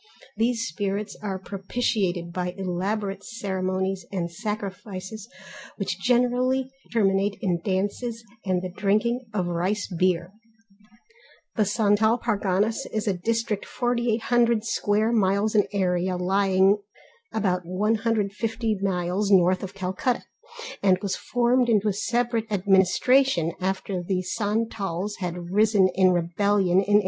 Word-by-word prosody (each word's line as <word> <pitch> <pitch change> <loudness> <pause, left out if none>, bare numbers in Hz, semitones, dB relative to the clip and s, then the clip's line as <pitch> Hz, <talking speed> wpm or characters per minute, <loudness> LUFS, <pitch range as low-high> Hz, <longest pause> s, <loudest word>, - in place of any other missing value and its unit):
These 230 0 +1
spirits 200 +5 -3
are 195 -3 -3
propitiated 195 -3 -2
by 180 0 -3
elaborate 195 +2 -2
ceremonies 190 -3 -2
and 175 -3 -2
sacrifices 205 +1 -6 0.5
which - - -3
generally 250 +2 +2 0.2
terminate 200 -2 +2
in 175 -3 -1
dances, 205 +5 -2 0.2
and 185 -2 0
the 185 - -4
drinking 215 +5 +1
of 195 -4 -1
rice 180 +4 -1
beer. 180 -1 0 1.2
The 215 - +2
Santal 215 +2 +3
Parganas 215 +1 0
is 215 0 -2
a 200 - +3
district 225 +2 -2
4800 235 -1 +1
sq. 230 - -3
miles 210 -1 +2
in 210 -2 +3
area, 185 -2 0
lying 190 +2 +3 0.5
about 190 -4 0
150 215 +3 -1
miles 190 +1 0
north 185 -1 +4
of 195 0 -7
Calcutta, 190 +6 -1 0.6
and 190 -2 +4
was 200 - -1
formed 245 0 +1
into 215 -2 +3
a - - 0
separate 235 +1 -1
administration 195 +1 +3
after 190 0 -2
the 185 +1 -1
Santals 205 -1 -2
had 175 -1 -5
risen 210 -2 +4
in 185 -1 +4
rebellion 180 +2 +1
in 205 +1 +4
1856. - - +6
200 Hz, 120 wpm, -25 LUFS, 185-225 Hz, 1.2 s, 1856